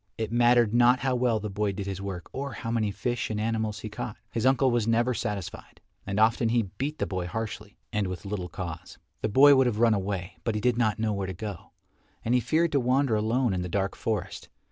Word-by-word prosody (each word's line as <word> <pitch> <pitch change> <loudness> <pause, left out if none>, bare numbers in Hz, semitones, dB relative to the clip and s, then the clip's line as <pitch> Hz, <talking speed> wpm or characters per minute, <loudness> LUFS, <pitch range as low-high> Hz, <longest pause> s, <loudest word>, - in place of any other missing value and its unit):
It 110 -1 -3
mattered 120 -2 +4
not 125 +1 +5
how 135 0 +1
well 120 -3 +1
the 105 - -4
boy 100 0 -1
did 100 0 -5
his 95 -1 -4
work 95 -4 -5
or 140 +1 -4
how 115 - -5
many 110 -3 +1
fish 120 +4 -2
and 105 -1 -2
animals 110 -1 -1
he 110 - -5
caught, 105 +1 -5
his 115 +2 0
uncle 130 0 +4
was 120 -2 +1
never 120 +2 +2
satisfied, 100 -4 -5 0.3
and 100 +1 -1
often 115 +1 +3
he 120 0 +2 0.2
beat 150 +3 -2
the - - -1
boy 90 -2 -3
harshly 105 -1 -5 0.2
and 105 -2 0
with 90 0 -6
little 95 -3 -4
cause. 90 -1 -7 0.2
The - - 0
boy 140 +7 +7
would 130 -1 +4
have 115 -4 -1
run 115 0 +4
away 95 -2 -3
but 115 - -1
he - - 0
did 125 +1 +2
not 110 -3 +2
know 110 -1 0
where 100 -1 -2
to 95 - -4
go, 100 -1 -7 0.6
and 115 - +1
he 125 - +5
feared 160 +6 +1
to 140 - +3
wander 130 -1 +2
alone 115 +2 +1
in 90 - -1
the 90 - -4
dark 95 +2 -1
forest. 105 -6 -3
110 Hz, 235 wpm, -27 LUFS, 100-120 Hz, 0.6 s, boy